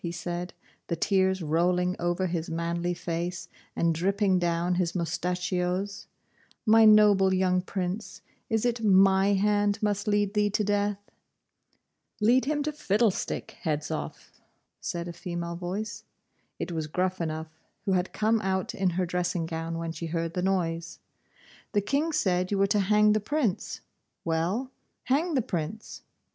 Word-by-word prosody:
he 170 - -2
said, 175 +1 -4 0.4
the 170 - -1
tears 190 +1 +1
rolling 180 +3 +1
over 175 +2 0
his 170 -2 -2
manly 170 +1 -1
face, 170 +1 -4 0.3
and 170 -1 +2
dripping 190 +3 +2
down 175 0 0
his 175 0 0
moustachios; 180 +3 -2 0.6
'my 225 0 +6
noble 210 -3 +6
young 185 -1 +2
Prince, 185 +2 -4 0.3
is 220 +1 +1
it 235 -1 0
my 195 0 +5
hand 205 +1 +2
must 205 -1 -1
lead 205 -1 +1
thee 210 -1 +2
to 210 +1 0
death?' 205 0 -1 1.1
'Lead 240 +5 +4
him 295 +1 0
to 305 - -1
fiddlestick, 215 -7 -1
Hedzoff,' 150 -2 -4 0.4
said 170 0 -4
a 170 - -6
female 170 0 -5
voice. 205 +5 -4 0.5
It - - -4
was 160 -2 -3
Gruffanuff, 160 -2 -2 0.3
who 195 - +1
had 180 0 +1
come 220 +1 +1
out 190 -2 -1
in 190 -2 +1
her 185 - +2
dressing 175 -1 -1
gown 165 0 -4
when 165 0 -3
she 165 +1 -5
heard 165 0 -2
the 180 - -1
noise. 170 -3 -1 0.8
'The 205 - +3
King 285 +9 0
said 185 - +1
you 205 - 0
were 195 - +4
to 200 +1 +2
hang 210 +2 +4
the 215 - +2
Prince. 240 -2 -1 0.4
Well, 175 +11 -1 0.3
hang 305 +6 +1
the 255 - +2
Prince. 190 - -5
185 Hz, 150 wpm, -28 LUFS, 170-205 Hz, 1.1 s, my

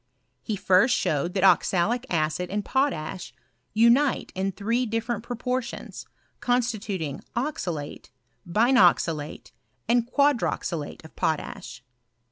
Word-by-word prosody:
He 215 - -3
first 195 +5 +4
showed 155 +5 -1
that 190 - +1
oxalic 205 +6 +3
acid 160 +2 -1
and 205 +1 -2
potash 195 - -1 0.4
unite 235 +6 +3
in 190 +1 -1
three 230 +6 -1
different 225 0 -2
proportions, 245 +1 -4 0.3
constituting 215 - -1
oxalate, 180 - -4 0.4
binoxalate, 175 - +2 0.4
and 235 0 +2
quadroxalate 235 - 0
of 160 - -14
potash. 130 -5 -3
210 Hz, 95 wpm, -26 LUFS, 175-245 Hz, 0.4 s, first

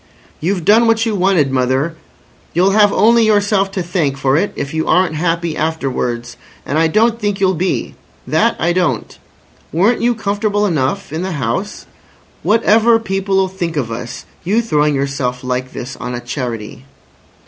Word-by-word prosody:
"You've 180 0 -1
done 230 +3 +5
what 225 0 +2
you 225 - -1
wanted, 180 -7 +2
mother. 130 +5 0 0.6
You'll 185 +3 +4
have 205 0 +5
only 230 +2 +4
yourself 205 -2 +2
to 185 - -2
thank 165 -6 -1
for 135 0 +1
it 200 +7 +1
if 140 +1 -4
you 160 0 -1
aren't 180 -1 +3
happy 165 0 -1
afterwards. 130 -6 -2 0.3
And 150 - 0
I 165 - +4
don't 225 +6 +2
think 205 -2 -1
you'll 190 -1 +3
be. 180 +2 -2 0.3
That 230 - +2
I 175 +1 +1
don't. 165 -11 -1 0.6
Weren't 200 +9 +2
you 240 0 +2
comfortable 205 -1 0
enough 150 -5 -1
in 160 - -2
the 185 0 -3
house? 145 - -3 0.6
Whatever 225 +1 +4
people'll 195 -2 0
think 175 -4 -4
of 120 -5 -2
us—you 175 - -3
throwing 150 -8 +1
yourself 135 -2 -2
like 125 0 -3
this 125 +2 -7
on 125 0 -5
a - - -4
Charity?" 120 -2 -5
175 Hz, 160 wpm, -16 LUFS, 140-205 Hz, 0.6 s, done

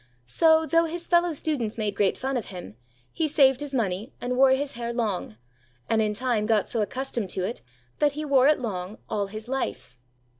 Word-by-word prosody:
So, 320 - +4
though 330 +1 +3
his 340 +1 -4
fellow 345 0 +3
students 280 -8 -2
made 210 -2 -1
great 200 -1 +1
fun 265 +1 -2
of 240 - -2
him, 180 - -9 0.4
he 320 - 0
saved 270 -3 +4
his 290 -1 -5
money 215 -3 -2
and 250 +1 -2
wore 265 +1 +6
his 270 +2 +1
hair 235 0 -4
long, 210 - -2 0.5
and 220 -1 +2
in 210 -1 0
time 230 -3 0
got 220 -3 +2
so 230 - -1
accustomed 240 -2 -3
to 185 - -2
it, 225 +6 -4 0.4
that 295 -1 +3
he 305 +1 -4
wore 275 -2 +4
it 300 - +4
long 200 -3 -4
all 205 -2 0
his 215 +3 -8
life. 250 - -4
245 Hz, 200 wpm, -26 LUFS, 210-280 Hz, 0.5 s, wore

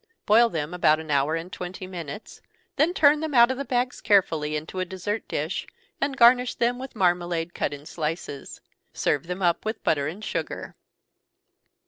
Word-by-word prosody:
Boil 230 +3 +5
them 160 -3 -3
about 155 -3 +3
an 160 -1 -6
hour 140 +3 +2
and 170 +3 -6
twenty 185 +1 -6
minutes, 180 +1 -8 0.3
then 305 +4 +3
turn 300 -4 +4
them 310 -3 -3
out 240 +1 +7
of 260 - -3
the 280 - -3
bags 250 -2 -1
carefully 160 -7 +2
into 155 +5 -5
a - - +1
dessert 190 +4 -4
dish, - - -3 0.3
and 275 -1 -1
garnish 245 +1 +5
them 240 +1 0
with 265 -1 -8
marmalade 175 -3 0
cut - - -1
in 145 0 -9
slices. 155 -3 -5 0.3
Serve 145 +2 0
them 180 +2 -4
up 170 -1 +2
with 220 +1 -4
butter 145 -3 +1
and 195 +8 -6
sugar. - - -4
185 Hz, 175 wpm, -25 LUFS, 160-240 Hz, 0.3 s, out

